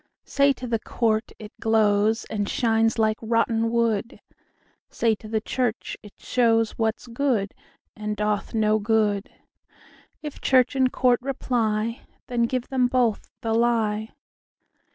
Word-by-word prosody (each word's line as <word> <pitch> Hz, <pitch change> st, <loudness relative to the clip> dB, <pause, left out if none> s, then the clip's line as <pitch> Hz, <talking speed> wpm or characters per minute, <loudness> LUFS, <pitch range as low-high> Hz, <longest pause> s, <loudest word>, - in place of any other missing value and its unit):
Say 280 Hz, 0 st, +3 dB
to 255 Hz, -, -8 dB
the 230 Hz, -2 st, -1 dB
court, 220 Hz, -1 st, -1 dB
it 210 Hz, -1 st, -10 dB
glowsAnd 215 Hz, -1 st, +1 dB
shines 225 Hz, -2 st, +1 dB
like 220 Hz, -1 st, +2 dB
rotten 230 Hz, 0 st, +1 dB
wood; 230 Hz, -1 st, 0 dB, 0.7 s
Say 230 Hz, -1 st, +1 dB
to 215 Hz, -, -12 dB
the 220 Hz, 0 st, -1 dB
church, 245 Hz, 0 st, -2 dB
it 210 Hz, -, -15 dB
showsWhat's 225 Hz, -1 st, +1 dB
good, 235 Hz, -5 st, -1 dB, 0.4 s
and 210 Hz, 0 st, -4 dB
doth 210 Hz, +1 st, -1 dB
no 215 Hz, 0 st, +2 dB
good:If 215 Hz, +7 st, -4 dB
church 255 Hz, 0 st, +3 dB
and 260 Hz, -1 st, +2 dB
court 250 Hz, -2 st, +2 dB
reply, 230 Hz, -4 st, -1 dB, 0.2 s
Then 235 Hz, -1 st, 0 dB
give 255 Hz, 0 st, -3 dB
them 255 Hz, -2 st, +2 dB
both 245 Hz, -4 st, 0 dB
the 225 Hz, -1 st, -1 dB
lie. 225 Hz, -2 st, +1 dB
225 Hz, 125 wpm, -24 LUFS, 215-245 Hz, 0.7 s, Say